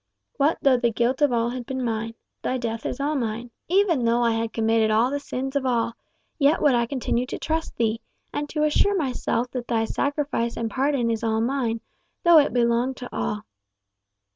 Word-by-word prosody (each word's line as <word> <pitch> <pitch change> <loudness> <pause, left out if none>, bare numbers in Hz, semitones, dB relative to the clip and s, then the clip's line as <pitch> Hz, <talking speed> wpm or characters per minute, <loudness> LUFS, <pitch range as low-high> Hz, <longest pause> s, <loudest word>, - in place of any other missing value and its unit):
What 295 +2 +2
though 270 -2 +5
the 240 -1 +2
guilt 240 +5 0
of 290 -3 +4
all 235 0 +1
had 245 -1 -6
been 260 -1 -2
mine? 225 0 -2 0.3
thy 260 - -1
death 230 -2 -3
is 250 - -4
all 290 +2 0
mine. 235 -3 -3 0.2
Even 355 -7 +3
though 235 +1 +2
I 235 - +3
had 225 0 -1
committed 225 -1 +2
all 225 +4 +3
the 285 - -1
sins 270 0 -4
of 280 - +1
all, 235 -3 0 0.5
yet 290 +3 +4
would 290 -3 +4
I 235 -1 +2
continue 250 -1 -1
to - - -4
trust 320 +1 -3
thee, 225 -1 0 0.3
and 295 0 -3
to 305 -1 -1
assure 390 +7 +3
myself 250 -4 -1
that 245 -2 -5
thy 225 -2 +1
sacrifice 280 -3 -1
and 225 -1 -2
pardon 265 -2 +1
is 225 0 -2
all 220 -1 +1
mine, 230 -2 -1 0.4
though 340 -2 +8
it 285 - +2
belong 240 +2 +1
to 250 - -8
all." 210 0 -2
245 Hz, 200 wpm, -24 LUFS, 230-280 Hz, 0.5 s, though